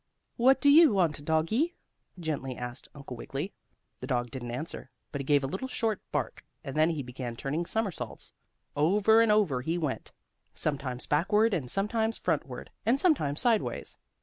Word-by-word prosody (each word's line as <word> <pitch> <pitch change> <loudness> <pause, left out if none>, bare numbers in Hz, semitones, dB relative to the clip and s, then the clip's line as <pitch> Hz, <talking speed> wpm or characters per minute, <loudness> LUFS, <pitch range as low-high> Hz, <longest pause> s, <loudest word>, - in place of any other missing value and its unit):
"What 265 +3 +5
do 285 +2 +5
you 315 -3 +8
want, 160 -7 +1
doggie?" 190 - +1 0.4
gently 140 -6 -3
asked 125 +1 -6
Uncle 140 -3 -8
Wiggily. 140 - -5 0.5
The - - -6
dog 120 -3 -1
didn't 125 -3 -6
answer, 130 +8 -6 0.2
but 140 - -3
he - - -7
gave 145 0 +3
a - - +1
little 190 - -3
short 225 -5 -1
bark, - - -3 0.2
and 135 - -6
then 155 +2 +4
he 155 -4 -2
began 125 -1 -6
turning 150 +8 -2
somersaults. 220 -5 -3 0.4
Over 205 +9 +4
and 230 -2 +4
over 190 -12 +2
he 165 +6 -1
went, 150 -6 -3 0.4
sometimes 135 -4 -2
backward 210 +8 +2
and 140 -9 -2
sometimes 220 - +1
frontward, 140 -7 -2
and 240 +5 +2
sometimes 215 - +2
sideways. 230 -3 0
160 Hz, 165 wpm, -29 LUFS, 135-220 Hz, 0.5 s, you